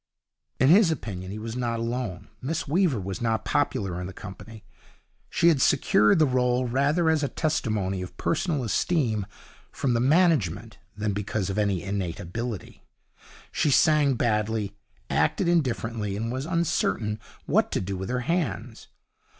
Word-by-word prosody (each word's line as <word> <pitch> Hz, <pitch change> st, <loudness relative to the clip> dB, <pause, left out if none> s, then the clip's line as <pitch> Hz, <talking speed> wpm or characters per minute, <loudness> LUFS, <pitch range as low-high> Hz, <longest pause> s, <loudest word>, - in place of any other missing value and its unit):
In 130 Hz, -, +5 dB
his 190 Hz, +2 st, +6 dB
opinion 100 Hz, -, -4 dB
he 100 Hz, -, -5 dB
was 110 Hz, +1 st, -5 dB
not 120 Hz, -2 st, -1 dB
alone. 115 Hz, -5 st, -3 dB
Miss 150 Hz, +5 st, -3 dB
Weaver 160 Hz, -, +2 dB
was 95 Hz, +1 st, -5 dB
not 115 Hz, -1 st, 0 dB
popular 90 Hz, -3 st, 0 dB
in 90 Hz, -, -4 dB
the 95 Hz, -, -8 dB
company. 105 Hz, +3 st, -10 dB, 0.7 s
She 170 Hz, -, +4 dB
had 150 Hz, -5 st, +2 dB
secured 105 Hz, -7 st, +4 dB
the 155 Hz, -, +5 dB
role 125 Hz, -1 st, +1 dB
rather 145 Hz, +7 st, +1 dB
as 160 Hz, -2 st, +3 dB
a 145 Hz, -, +1 dB
testimony 110 Hz, -, -1 dB
of 90 Hz, -, -8 dB
personal 160 Hz, -4 st, 0 dB
esteem 115 Hz, -, 0 dB, 0.4 s
from 130 Hz, -3 st, -1 dB
the 115 Hz, -, +2 dB
management 120 Hz, -, +2 dB, 0.2 s
than 105 Hz, -1 st, -1 dB
because 100 Hz, 0 st, -2 dB
of 100 Hz, -, -2 dB
any 100 Hz, -4 st, 0 dB
innate 95 Hz, -4 st, -3 dB
ability. 105 Hz, +3 st, -6 dB, 0.7 s
She 150 Hz, -, +1 dB
sang 145 Hz, -1 st, +4 dB
badly, 105 Hz, -3 st, 0 dB, 0.3 s
acted 80 Hz, -, +1 dB
indifferently, 115 Hz, -, 0 dB
and 115 Hz, +2 st, -2 dB
was 130 Hz, +4 st, -3 dB
uncertain 145 Hz, -10 st, 0 dB, 0.3 s
what -, -, +2 dB
to -, -, 0 dB
do 95 Hz, +1 st, -3 dB
with 95 Hz, +1 st, -5 dB
her 125 Hz, 0 st, -1 dB
hands. 160 Hz, -, -2 dB
115 Hz, 155 wpm, -26 LUFS, 100-145 Hz, 0.7 s, his